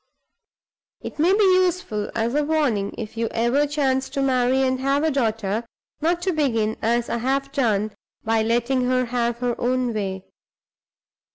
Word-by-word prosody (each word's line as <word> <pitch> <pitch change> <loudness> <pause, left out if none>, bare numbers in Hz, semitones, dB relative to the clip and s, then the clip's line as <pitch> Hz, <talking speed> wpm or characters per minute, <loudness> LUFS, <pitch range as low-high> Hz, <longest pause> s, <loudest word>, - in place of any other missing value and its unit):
"It - - -8
may 335 +4 +4
be 415 +2 +4 0.2
useful 345 - -2
as 230 +1 0
a 295 +1 +2
warning, 285 -10 0
if 225 0 -7
you 230 0 0
ever 245 +6 +1
chance 270 -3 0
to 275 - -2
marry 260 0 +2
and 260 0 0
have 275 +2 +1
a 320 - +2
daughter, 225 -5 -1 0.4
not 340 +3 0
to 375 -1 +1
begin, 230 -8 0
as 235 +1 +1
I - - -1
have 275 +3 -1
done, 215 -6 +1 0.3
by 225 0 +1
letting 240 +3 +1
her 255 0 +1
have 235 -1 -1
her 245 0 -1
own 250 -1 0
way." 190 -3 -3
250 Hz, 165 wpm, -23 LUFS, 225-275 Hz, 0.4 s, may